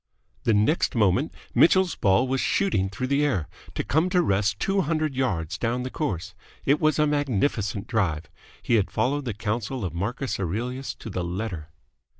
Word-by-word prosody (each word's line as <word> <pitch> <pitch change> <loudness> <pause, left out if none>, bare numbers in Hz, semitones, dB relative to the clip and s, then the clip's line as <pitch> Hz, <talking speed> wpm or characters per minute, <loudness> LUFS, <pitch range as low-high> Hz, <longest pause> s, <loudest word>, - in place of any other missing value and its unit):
The 115 - +4
next 110 +11 +2
moment 110 - +2 0.2
Mitchell's 185 +1 +5
ball 100 +6 +3
was 130 0 0
shooting 100 - +1
through 115 +6 -4
the 140 +2 +2
air, 95 - 0 0.3
to - - -1
come 160 +5 +1
to 180 -1 +3
rest 100 -3 +1
two 195 0 +1
hundred 155 -3 0
yards 90 - -1
down 120 +2 -1
the 130 - -5
course. 95 - -3 0.3
It 140 +2 +3
was 155 -1 +3
a 150 - +4
magnificent 125 -8 0
drive. 85 - -1 0.4
He 115 - +3
had 100 - +1
followed 145 +2 0
the 115 -5 -3
counsel 110 +2 -2
of 85 - -4
Marcus 115 +10 -2
Aurelius 120 +9 -3
to 110 - -8
the 90 -1 -2
letter. 90 -3 -4
120 Hz, 175 wpm, -25 LUFS, 95-145 Hz, 0.4 s, Mitchell's